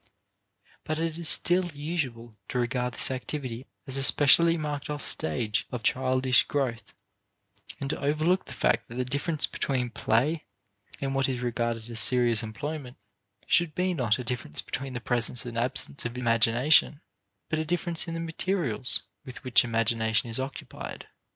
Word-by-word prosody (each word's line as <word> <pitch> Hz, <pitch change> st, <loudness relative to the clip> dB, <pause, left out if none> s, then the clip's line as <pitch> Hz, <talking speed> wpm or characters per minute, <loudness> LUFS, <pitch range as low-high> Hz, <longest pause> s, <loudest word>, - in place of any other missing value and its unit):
But 155 Hz, -, -3 dB
it 165 Hz, 0 st, -2 dB
is 165 Hz, -2 st, +3 dB
still 180 Hz, +1 st, +4 dB
usual 140 Hz, -7 st, -4 dB, 0.2 s
to -, -, -3 dB
regard 125 Hz, 0 st, -1 dB
this -, -, +4 dB
activity 130 Hz, -2 st, -5 dB, 0.2 s
as 135 Hz, -2 st, 0 dB
a -, -, +1 dB
specially 165 Hz, +6 st, +6 dB
marked 150 Hz, -2 st, -4 dB
off 150 Hz, -1 st, -4 dB
stage 115 Hz, -8 st, -1 dB
of 125 Hz, -3 st, -5 dB
childish 130 Hz, +1 st, +3 dB
growth, 130 Hz, -5 st, -3 dB, 0.8 s
and 140 Hz, -, -4 dB
to -, -, -5 dB
overlook 155 Hz, +6 st, +1 dB
the 135 Hz, -, -9 dB
fact -, -, +1 dB
that 120 Hz, -, -10 dB
the 125 Hz, 0 st, -1 dB
difference 145 Hz, +4 st, 0 dB
between 125 Hz, -3 st, -2 dB
play 130 Hz, +9 st, 0 dB, 0.5 s
and 135 Hz, -1 st, -2 dB
what 135 Hz, 0 st, +1 dB
is 125 Hz, -2 st, -3 dB
regarded 120 Hz, -2 st, -2 dB
as 115 Hz, -1 st, +4 dB
serious 120 Hz, -2 st, +6 dB
employment 130 Hz, +4 st, -6 dB, 0.5 s
should 170 Hz, -3 st, +1 dB
be 180 Hz, 0 st, 0 dB
not 120 Hz, -9 st, +1 dB
a 125 Hz, -, -5 dB
difference 115 Hz, -, -2 dB
between 135 Hz, 0 st, -5 dB
the 120 Hz, -, -5 dB
presence 120 Hz, +2 st, +1 dB
and 120 Hz, -1 st, -7 dB
absence 115 Hz, -, -1 dB
of 120 Hz, +1 st, -5 dB
imagination, 120 Hz, +6 st, +3 dB, 0.5 s
but 155 Hz, -, -1 dB
a -, -, 0 dB
difference 170 Hz, +1 st, -1 dB
in 165 Hz, -, -4 dB
the -, -, -3 dB
materials 165 Hz, -, -2 dB, 0.2 s
with 130 Hz, -1 st, -10 dB
which 130 Hz, -1 st, +4 dB
imagination 115 Hz, -1 st, 0 dB
is 115 Hz, -, -2 dB
occupied. 135 Hz, +1 st, -7 dB
130 Hz, 165 wpm, -27 LUFS, 120-150 Hz, 0.8 s, specially